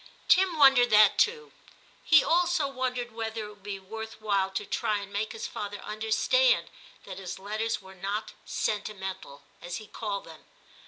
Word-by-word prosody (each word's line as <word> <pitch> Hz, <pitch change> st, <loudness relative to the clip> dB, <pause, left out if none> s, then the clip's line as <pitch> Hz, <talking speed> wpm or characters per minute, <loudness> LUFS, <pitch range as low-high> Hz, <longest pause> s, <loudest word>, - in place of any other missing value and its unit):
Tim 365 Hz, -2 st, +4 dB
wondered 270 Hz, -4 st, +6 dB
that 210 Hz, -1 st, +6 dB
too; 455 Hz, 0 st, +1 dB, 0.5 s
he 315 Hz, -, +6 dB
also 345 Hz, -3 st, +2 dB
wondered 255 Hz, -2 st, -3 dB
whether 225 Hz, -1 st, -4 dB
it -, -, -9 dB
would 205 Hz, -1 st, -16 dB
be 200 Hz, 0 st, -5 dB
worth 220 Hz, +3 st, -8 dB
while 200 Hz, -3 st, +1 dB
to 190 Hz, -, -4 dB
try 210 Hz, -, 0 dB
and 200 Hz, 0 st, -8 dB
make 210 Hz, +2 st, -2 dB
his 225 Hz, -, -6 dB
father 205 Hz, 0 st, -5 dB
understand 220 Hz, -, +1 dB, 0.3 s
that 190 Hz, -1 st, -8 dB
his 185 Hz, -2 st, -6 dB
letters 215 Hz, +2 st, -3 dB
were 190 Hz, 0 st, -12 dB
not 200 Hz, +3 st, -4 dB
* -, -, -32 dB, 0.2 s
sentimental,' 190 Hz, -7 st, -5 dB, 0.2 s
as 175 Hz, 0 st, -5 dB
he 215 Hz, -, -7 dB
called 205 Hz, -2 st, -4 dB
them. 160 Hz, -1 st, -14 dB
215 Hz, 170 wpm, -28 LUFS, 200-245 Hz, 0.5 s, wondered